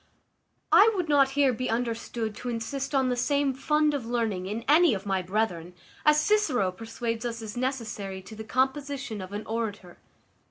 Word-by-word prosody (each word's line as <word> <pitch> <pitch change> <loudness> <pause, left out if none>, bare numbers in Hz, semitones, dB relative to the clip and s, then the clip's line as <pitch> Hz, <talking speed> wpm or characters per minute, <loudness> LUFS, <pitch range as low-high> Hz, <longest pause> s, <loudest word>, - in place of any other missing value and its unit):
I 440 +2 +7
would 360 -4 -1
not 280 -2 +5
here 275 -3 +4
be 255 +2 -3
understood 230 -1 -2
to 250 - -5
insist 265 +5 -3
on 265 -1 +3
the 250 - +1
same 280 +2 +1
fund 300 +3 +1
of 280 -4 -2
learning 225 -6 -1
in 220 +4 -4
any 310 -2 +5
of 195 +1 -6
my 195 -2 0
brethren, 180 -3 -2 0.3
as 300 0 +5
Cicero 300 - +2
persuades 225 +3 -4
us 235 -1 -3
is 215 -1 -7
necessary 220 -7 -3
to 220 - -11
the 220 - -7
composition 265 -2 -1
of 185 0 -8
an 205 +1 -5
orator. 210 -5 -4
235 Hz, 175 wpm, -27 LUFS, 215-275 Hz, 0.3 s, I